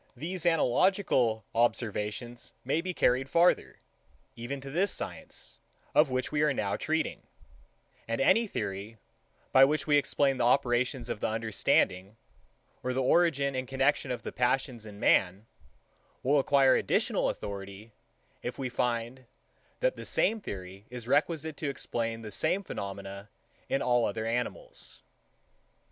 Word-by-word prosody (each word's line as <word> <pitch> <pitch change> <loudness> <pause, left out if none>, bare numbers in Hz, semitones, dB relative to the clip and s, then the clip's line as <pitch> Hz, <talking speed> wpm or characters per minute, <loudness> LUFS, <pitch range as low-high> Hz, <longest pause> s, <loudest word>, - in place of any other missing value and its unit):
These 175 +2 -2
analogical 150 - +2
observations 115 0 -1
may 145 +5 +1
be 185 +1 -3
carried 130 -5 +1
farther, 170 +3 +3 0.6
even 120 +4 -5
to 135 0 -8
this 185 +7 +1
science, - - -7 0.3
of 150 -1 +5
which 130 0 -2
we 150 -1 +1
are 150 -2 +2
now 100 -3 -1
treating; 160 0 -2 0.9
and 115 0 -2
any 225 +11 +4
theory, 100 - -5 0.5
by 135 - +7
which 150 +3 +2
we 145 -1 +4
explain 140 -1 +1
the 125 - 0
operations 125 0 +1
of - - -4
the - - 0
understanding, 110 -2 0 0.6
or 130 - -2
the 130 - 0
origin 140 -2 +3
and 130 0 -3
connexion 135 +1 +1
of 120 -3 -4
the - - -5
passions 125 -2 -1
in 100 -1 -11
man, 95 +2 +2 0.8
will 140 +3 +3
acquire 135 -1 +4
additional - - +1
authority, 100 +2 -7 0.5
if 120 - -5
we 130 -2 -3
find, 120 +1 -2 0.6
that - - +2
the - - -8
same 225 0 +1
theory 95 - -8
is 120 -1 -8
requisite 155 +2 +1
to 150 - -2
explain 115 -4 -3
the 105 - -7
same 175 - 0
phenomena 100 - -7 0.4
in 135 - 0
all 120 -1 +3
other 110 +2 -3
animals. 125 - -4
125 Hz, 140 wpm, -29 LUFS, 115-145 Hz, 0.9 s, by